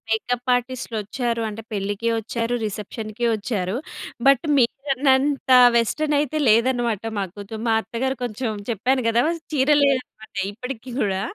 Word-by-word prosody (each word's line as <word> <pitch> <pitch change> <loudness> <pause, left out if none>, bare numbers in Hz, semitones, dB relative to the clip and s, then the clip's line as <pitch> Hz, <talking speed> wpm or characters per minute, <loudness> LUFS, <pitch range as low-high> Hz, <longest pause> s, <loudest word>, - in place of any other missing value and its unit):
Makeup 245 +3 -1
ఆర్టిస్ట్‌‌లొచ్చారు 240 -1 -3
అంటే 215 +1 -6
పెళ్ళికి 205 +2 -2
ఒచ్చారు, 230 +2 -3
రిసెప్షన్‌‌‌కి 215 +2 -4
ఒచ్చారు. 200 -3 -2 0.5
But, 275 +3 +5
మీరన్నంత 270 +1 +1 0.2
western 295 +6 +1
అయితే 300 +1 -1
లేదనమాట. 235 -1 +2 0.2
మా 200 - 0
కూతు 205 +1 -8
మా 225 - +3
అత్తగారు 265 +4 -2
కొంచెం 240 0 -3 0.2
చెప్పాను 250 +4 +1
గదా! 230 +1 +3 0.3
చీరలే 285 0 +4
అనమాట 220 -4 -14 0.2
ఇప్పటికి 250 +3 -7
కూడా. 190 -2 0
235 Hz, 120 wpm, -22 LUFS, 215-265 Hz, 0.5 s, But